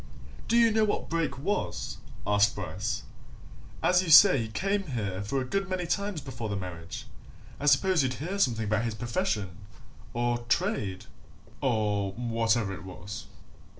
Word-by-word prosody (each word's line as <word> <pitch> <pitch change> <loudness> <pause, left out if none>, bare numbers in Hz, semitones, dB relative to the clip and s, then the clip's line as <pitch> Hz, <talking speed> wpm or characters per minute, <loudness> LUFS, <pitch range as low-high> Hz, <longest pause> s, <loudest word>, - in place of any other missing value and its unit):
"Do 235 - +3
you 230 -1 +6
know 220 0 +3
what 210 - -1
Brake 165 -5 0
was?" 200 +10 -2 0.3
asked 100 0 +3
Bryce. - - -3 0.8
"As 180 0 +5
you 185 - -4
say 145 -3 +9
he 115 - -2
came 195 - -1
here 100 -8 -3
for 120 +7 -1
a 130 - -2
good 195 +8 -2
many 185 -1 -1
times 200 -1 -1
before 125 -5 -6
the 100 - -2
marriage, 90 -3 -6 0.5
I 145 - -2
suppose 160 +4 +4
you'd 130 -1 0
hear 185 +7 -4
something 115 - +2
about 110 +2 0
his 115 -2 -2
profession, 115 - -2 0.5
or 120 0 0
trade, 140 - 0 0.6
or 105 -6 0
whatever 115 -3 0
it 95 - -8
was?" 95 +4 -8
120 Hz, 155 wpm, -28 LUFS, -, 0.8 s, say